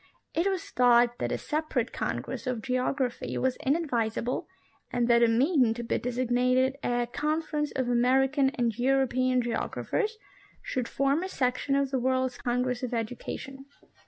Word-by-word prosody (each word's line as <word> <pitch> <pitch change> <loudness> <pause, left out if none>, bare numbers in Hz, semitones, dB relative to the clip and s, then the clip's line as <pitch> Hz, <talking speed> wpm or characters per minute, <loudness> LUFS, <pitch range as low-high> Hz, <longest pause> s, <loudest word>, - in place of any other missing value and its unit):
It 335 +4 +1
was 380 -3 -4
thought 240 -1 +4
that - - -2
a - - 0
separate 300 -6 -2
congress - - -4
of 245 -3 -2
geography 255 0 -1
was 260 -1 +1
inadvisable 255 -2 -1 0.4
and 240 -1 +1
that 235 -1 +5
a 235 - +6
meeting 250 0 +3
to 240 - -5
be 230 - -1
designated 250 +2 +1
a 240 0 +1
" 240 - -27
Conference 300 -1 -1
of 260 -2 0
American 265 +3 +3
and 235 -3 0
European 255 -1 +2
geographers," 425 - -2 0.5
should 250 -3 -2
form 275 +3 +1
a 375 - -4
section 255 -1 0
of 275 -1 +1
the 265 - +1
World's 260 0 0
Congress 250 0 -1
of 250 -1 -3
Education. 260 +4 -5
255 Hz, 155 wpm, -28 LUFS, 245-275 Hz, 0.5 s, a